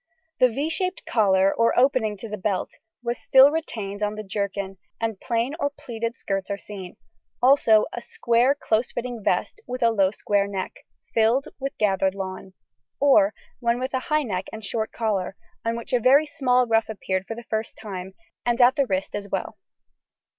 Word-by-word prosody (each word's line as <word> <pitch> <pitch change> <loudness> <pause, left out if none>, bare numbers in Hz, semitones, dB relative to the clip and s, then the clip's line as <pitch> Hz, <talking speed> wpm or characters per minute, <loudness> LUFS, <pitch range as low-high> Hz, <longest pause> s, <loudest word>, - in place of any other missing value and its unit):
The 255 - +7
=V= 275 +6 -2
shaped 365 +2 -2
collar, 195 -3 +3
or 230 0 +2
opening 245 -5 +3
to 210 - -7
the 210 - -4
belt, 195 -1 -2 0.3
was 240 0 -2
still 265 +2 +7
retained 215 -11 -4
on 210 0 -1
the 215 - -6
jerkin, 200 -1 -3 0.2
and 225 -3 -2
plain 235 +3 -1
or 285 - +1
pleated 235 -4 -5
skirts 195 0 -3
are 200 - -2
seen, 195 -3 -9 0.4
also 245 -4 +5
a 240 - -5
square 240 +4 +2
close 230 -4 0
fitting 240 -1 -4
vest, 440 - 0
with 250 0 -3
a 230 - +5
low 195 -4 +3
square 200 0 0
neck, 195 -2 -6 0.3
filled 230 +4 +2
with 275 0 -4
gathered 195 -2 +1
lawn, 190 -1 -6 0.5
or 240 -8 +5 0.2
one 235 0 +1
with 260 +1 -3
a 260 - +1
high 305 0 +3
neck 190 -6 -3
and 220 -1 -7
short 220 +1 -2
collar, 200 -5 -1 0.3
on 230 0 -1
which 235 +3 -7
a 250 - +4
very 270 +6 +5
small 255 -5 +2
ruff 225 -2 +2
appeared 190 -3 -3
for 225 - -4
the 235 - -9
first 220 -1 -3
time, 190 -2 -7 0.3
and 240 0 0
at 250 +2 +6
the 275 -2 +2
wrist 190 -2 -2
as 200 -1 -5
well. - - -3
225 Hz, 185 wpm, -24 LUFS, 200-250 Hz, 0.5 s, The